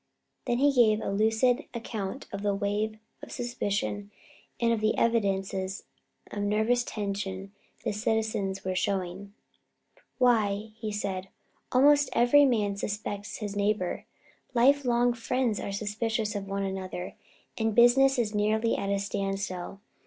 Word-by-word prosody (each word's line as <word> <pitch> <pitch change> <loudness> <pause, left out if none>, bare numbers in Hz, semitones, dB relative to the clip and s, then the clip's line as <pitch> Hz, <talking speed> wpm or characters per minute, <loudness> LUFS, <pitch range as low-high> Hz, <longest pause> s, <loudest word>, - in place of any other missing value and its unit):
Then 240 - +1
he 285 +2 +4
gave 220 -4 +4
a - - -3
lucid 225 +6 +2
account 225 +1 -5
of 200 - -5
the 205 -1 +1
wave 210 +2 -1 0.2
of - - -10
suspicion 205 -4 -2 0.5
and 235 -1 +3
of 225 - 0
the 215 0 +1
evidences 195 -4 0 0.5
of 205 - -4
nervous 220 +4 +2
tension 195 -3 -4 0.3
the 225 - 0
citizens 210 -3 -1
were 185 - 0
showing. 195 +1 -2 0.8
"Why," 215 -4 +2 0.2
said 195 -2 -3
he, - - -26 0.4
"almost 285 +2 +5
every 245 +5 +6
man 210 -6 +1
suspects 205 0 -4
his 205 -2 -5
neighbor. 205 -3 -1 0.5
Life 275 +4 +4
long 240 0 +3
friends 235 -1 -1
are - - -4
suspicious 215 +1 -2
of 200 -1 -4
one 195 0 -2
another 190 -1 -4 0.4
and 220 -1 -1
business 265 +3 +6
is 220 -3 0
nearly 215 +2 +1
at 195 - -2
a 200 - +1
standstill. 195 -1 -3
210 Hz, 140 wpm, -28 LUFS, 200-235 Hz, 0.8 s, every